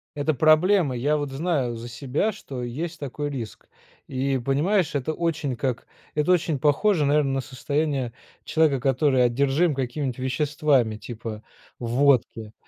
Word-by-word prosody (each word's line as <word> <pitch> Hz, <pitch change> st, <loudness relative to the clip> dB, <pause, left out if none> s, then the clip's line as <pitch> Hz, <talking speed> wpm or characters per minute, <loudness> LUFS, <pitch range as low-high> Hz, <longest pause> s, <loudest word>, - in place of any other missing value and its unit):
Это 145 Hz, +2 st, 0 dB
проблема. 155 Hz, +1 st, +4 dB
Я 145 Hz, +5 st, +1 dB
вот 145 Hz, -2 st, -3 dB
знаю 135 Hz, -5 st, -1 dB
за 115 Hz, +1 st, -7 dB
себя, 135 Hz, -, -1 dB
что 135 Hz, -11 st, -7 dB
есть 155 Hz, +8 st, -5 dB
такой 145 Hz, +1 st, -4 dB
риск 120 Hz, -6 st, -7 dB, 0.4 s
и 135 Hz, 0 st, -1 dB
понимаешь 155 Hz, -, +1 dB
это 145 Hz, +3 st, -1 dB
очень 160 Hz, -5 st, -2 dB
как 125 Hz, -1 st, -2 dB, 0.3 s
это 150 Hz, +4 st, +2 dB
очень 165 Hz, -4 st, +2 dB
похоже 150 Hz, +5 st, +2 dB
наверно 145 Hz, -1 st, +2 dB
на 135 Hz, -, 0 dB
состояние 135 Hz, -1 st, -2 dB, 0.3 s
человека, 155 Hz, -5 st, +2 dB
который 135 Hz, -1 st, +3 dB
одержим 140 Hz, +6 st, +2 dB
какими 135 Hz, +1 st, -2 dB
веществами 130 Hz, -3 st, +1 dB
типа 110 Hz, -2 st, -7 dB, 0.4 s
водки, 120 Hz, -3 st, +1 dB
140 Hz, 135 wpm, -24 LUFS, 125-155 Hz, 0.4 s, проблема